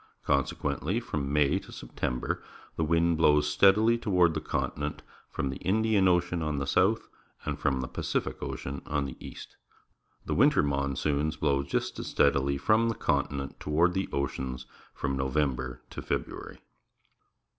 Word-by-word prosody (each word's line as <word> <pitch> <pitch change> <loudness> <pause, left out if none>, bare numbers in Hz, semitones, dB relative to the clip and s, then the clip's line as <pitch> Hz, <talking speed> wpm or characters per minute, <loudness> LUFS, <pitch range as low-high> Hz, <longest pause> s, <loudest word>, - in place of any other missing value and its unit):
Consequently 70 - 0
from 75 - -3
May 75 -1 +3
to - - -14
September 60 +1 -3 0.3
the 80 - 0
wind 85 +1 +2
blows 75 -2 +4
steadily 105 +9 +4
toward 90 -7 +3
the 80 - -2
continent 75 -1 -3 0.3
from 70 - -2
the 65 - -6
Indian 105 0 +2
Ocean 90 -1 +2
on 75 -2 -1
the 70 - -1
south 70 - +2 0.4
and 75 -1 -3
from 70 -3 +1
the 65 - -4
Pacific - - -3
Ocean 70 +1 -5
on 70 -1 0
the 65 - -6
east. - - -10 0.7
The - - -1
winter - - +4
monsoons 70 +2 0
blow 70 -2 +1
just 70 - -2
as - - -5
steadily 70 0 +2
from 110 +10 +3
the 115 - -1
continent 70 -1 -1
toward 85 +4 +2
the 95 +1 -1
oceans 65 -2 -3 0.3
from 70 -1 -2
November 65 -2 -1
to - - -6
February. - - -4
75 Hz, 150 wpm, -29 LUFS, 70-85 Hz, 0.7 s, blows